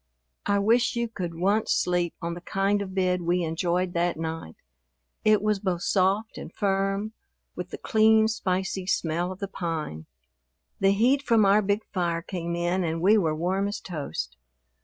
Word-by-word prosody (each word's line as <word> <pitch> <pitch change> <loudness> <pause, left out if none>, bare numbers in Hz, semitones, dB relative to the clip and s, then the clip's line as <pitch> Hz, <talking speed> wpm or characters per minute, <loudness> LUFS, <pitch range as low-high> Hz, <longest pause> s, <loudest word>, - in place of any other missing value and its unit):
I 200 - +3
wish 230 +5 +3
you 235 0 0
could 180 -7 -5
once 200 +6 +1
sleep 175 -1 +1
on 170 0 -2
the 175 - -8
kind 195 +3 0
of 190 -1 -6
bed 180 -1 +1
we 175 +1 +1
enjoyed 175 +2 -1
that 170 0 0
night. 160 - -5 0.7
It 215 -2 +4
was 210 -1 +1
both 185 -3 -2
soft 195 +3 +1
and - - -8
firm, 195 +1 -1 0.4
with - - -6
the - - -6
clean, 220 0 +4
spicy 190 -3 -2
smell 175 0 0
of 185 - -7
the 200 - -4
pine. 160 - -4 0.7
The 195 - +4
heat 250 +7 +3
from 230 -6 +3
our 200 +2 +5
big 205 +1 0
fire 170 -3 -1
came 170 -2 -4
in 175 +2 0
and 165 -1 -1
we 195 +6 +5
were 165 -7 +2
warm 185 +5 0
as 205 - -4
toast. 80 - -5
185 Hz, 175 wpm, -26 LUFS, 170-205 Hz, 0.7 s, our